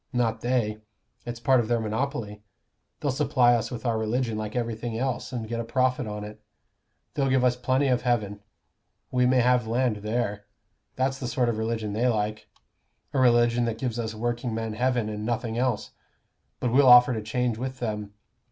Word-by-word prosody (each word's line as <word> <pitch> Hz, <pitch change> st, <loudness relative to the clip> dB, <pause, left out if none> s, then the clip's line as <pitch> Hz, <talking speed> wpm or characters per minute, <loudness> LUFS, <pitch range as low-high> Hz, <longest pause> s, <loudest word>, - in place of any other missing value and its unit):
Not 115 Hz, -2 st, 0 dB
they. 120 Hz, -4 st, 0 dB, 0.5 s
It's 120 Hz, -1 st, -5 dB
part 130 Hz, +1 st, +4 dB
of 115 Hz, -, 0 dB
their 120 Hz, 0 st, +1 dB
monopoly. 110 Hz, -2 st, -3 dB, 0.6 s
They'll 145 Hz, -, 0 dB
supply 130 Hz, -3 st, +3 dB
us 115 Hz, -1 st, 0 dB
with 120 Hz, 0 st, -7 dB
our 115 Hz, -2 st, +1 dB
religion 115 Hz, +1 st, -1 dB
like 110 Hz, +1 st, -4 dB
everything 115 Hz, -1 st, -3 dB
else, 130 Hz, 0 st, -2 dB
and 120 Hz, -4 st, -4 dB
get 115 Hz, +1 st, -3 dB
a -, -, -1 dB
profit 125 Hz, +1 st, 0 dB
on 105 Hz, 0 st, -5 dB
it. 105 Hz, +1 st, -10 dB, 0.7 s
They'll 135 Hz, -2 st, 0 dB
give 130 Hz, -1 st, +3 dB
us 125 Hz, -1 st, +3 dB
plenty 130 Hz, +3 st, +1 dB
of 125 Hz, -2 st, +2 dB
heaven. 110 Hz, -5 st, -1 dB, 0.7 s
We 125 Hz, 0 st, +3 dB
may 130 Hz, 0 st, +4 dB
have 125 Hz, -1 st, +2 dB
land 120 Hz, -1 st, +1 dB
there. 105 Hz, -1 st, -2 dB, 0.5 s
That's 135 Hz, +1 st, 0 dB
the 125 Hz, -, -4 dB
sort 125 Hz, 0 st, +1 dB
of 110 Hz, -2 st, -2 dB
religion 110 Hz, -2 st, -2 dB
they 115 Hz, +4 st, +1 dB
like 110 Hz, -2 st, -1 dB, 0.6 s
a 135 Hz, -, +1 dB
religion 120 Hz, -1 st, +4 dB
that 115 Hz, -1 st, -2 dB
gives 120 Hz, -2 st, -3 dB
us 110 Hz, -1 st, -3 dB
workingmen 115 Hz, -1 st, -2 dB
heaven, 125 Hz, -1 st, 0 dB
and 105 Hz, 0 st, -5 dB
nothing 115 Hz, 0 st, -2 dB
else. 125 Hz, -4 st, -1 dB, 0.7 s
But 125 Hz, -, -1 dB
we'll 135 Hz, +1 st, +5 dB
offer 125 Hz, +1 st, +8 dB
to 110 Hz, -, -3 dB
change 115 Hz, +1 st, -1 dB
with 130 Hz, +1 st, -4 dB
them. 105 Hz, -4 st, -4 dB
120 Hz, 185 wpm, -26 LUFS, 110-125 Hz, 0.7 s, offer